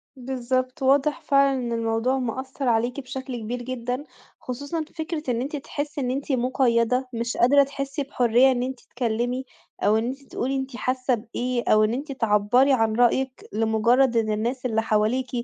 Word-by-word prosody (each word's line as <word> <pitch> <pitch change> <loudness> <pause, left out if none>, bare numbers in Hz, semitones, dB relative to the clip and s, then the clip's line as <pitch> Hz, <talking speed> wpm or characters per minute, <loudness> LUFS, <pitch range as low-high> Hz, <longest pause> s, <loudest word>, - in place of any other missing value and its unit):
بالضبط، 255 +1 -2
واضح 275 +1 +3
فعلًا 275 -1 +3
إن 240 -1 -3
الموضوع 230 +3 0
مأثّر 260 +2 -4
عليكِ 240 +3 +1
بشكل 260 -1 -6
كبير 240 +3 -4
جدًا، 250 +2 -4 0.4
خصوصًا 285 +6 -4
فكرة 315 -1 -4
إن 235 - -1
أنتِ 285 +4 -4
تحسي 290 +1 -4
إن 250 -1 -1
أنتِ 275 +2 -3
مُقيّدة، 250 0 +1
مش 235 +1 -3
قادرة 280 +4 +6
تحسي 275 +1 -4
بحُرية 250 -1 +3
إن 245 -1 0
أنتِ 260 0 -4
تكلمي 245 +2 -2 0.4
أو 215 +1 +4
إن 225 - 0
أنتِ 270 +2 -5
تقولي 270 0 -3
أنتِ 265 -1 -4
حاسة 255 0 0
بإيه 240 +2 -3
أو 215 0 +5
إن 215 +2 +1
أنتِ 280 +3 -4
تعبّري 235 +2 +3
عن 225 -3 +2
رأيِّك 255 +2 +1
لمُجرد 230 +3 +3
إن 215 -1 +1
الناس 240 +5 -2
اللي 225 -2 +1
حواليكِ 225 +4 +1
255 Hz, 165 wpm, -24 LUFS, 235-270 Hz, 0.4 s, قادرة